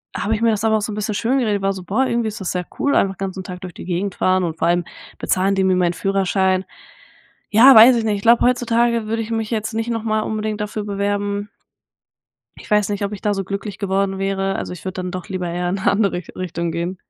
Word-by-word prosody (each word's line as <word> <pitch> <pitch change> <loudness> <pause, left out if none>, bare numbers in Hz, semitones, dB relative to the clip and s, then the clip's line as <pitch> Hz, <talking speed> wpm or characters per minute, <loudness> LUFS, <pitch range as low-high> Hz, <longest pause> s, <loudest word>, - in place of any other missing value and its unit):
habe 215 - -1
ich 220 - -2
mir 230 - +4
das 215 -1 -2
aber 220 -1 +3
auch 215 - -2
so 210 0 -3
'n - - -5
bisschen 210 0 -2
schön 250 +6 +1
geredet, 210 -5 0
war 195 0 +1
so: 185 - -8
„Boah, 215 +9 +1
irgendwie 235 -2 0
ist 215 - -8
sehr 180 -2 -3
cool, 285 - +2
einfach 195 -1 +1
ganzen 190 -1 -4
Tag 180 -1 -8
durch 180 -2 -8
die - - -10
Gegend 185 +2 -2
fahren 185 0 +2
und 165 -1 -4
vor - - +1
allem 175 0 +1 0.3
bezahlen 195 +1 +1
die 190 - +2
mir 185 -1 +3
meinen 180 -1 +2
Führerschein.“ 190 0 +1 0.9
Ja, 260 +4 +9
weiß 235 +3 +9
ich 230 - -1
nicht. 210 -2 +1
Ich 200 - -7
glaube, 235 0 +5
heutzutage 235 -2 +1
würde 225 +1 -2
ich 220 - -8
mich 225 -1 -2
jetzt 220 -1 -2
nicht 225 +1 -2
noch 225 -1 -2
mal 215 -1 +1
unbedingt 215 0 -3
dafür 210 0 -4
bewerben. 205 0 -2 1.1
Ich - - -14
weiß 210 -2 +3
nicht, 205 -1 -2
ob 200 - -3
ich 200 - -6
da 210 -1 0
so 195 -1 -3
glücklich 200 +1 -5
geworden 195 -1 -1
wäre. 195 0 -1
Also - - -5
ich 180 - -10
würde 185 - -3
dann 180 -1 -4
doch 185 -1 -6
lieber 185 -2 -3
eher 175 +1 -2
in 185 - -1
'ne 195 - +1
andere 200 -1 +1
Rich 175 -1 -6
Richtung 170 -2 -3
gehen. 170 +3 -3
200 Hz, 255 wpm, -20 LUFS, 185-220 Hz, 1.1 s, Ja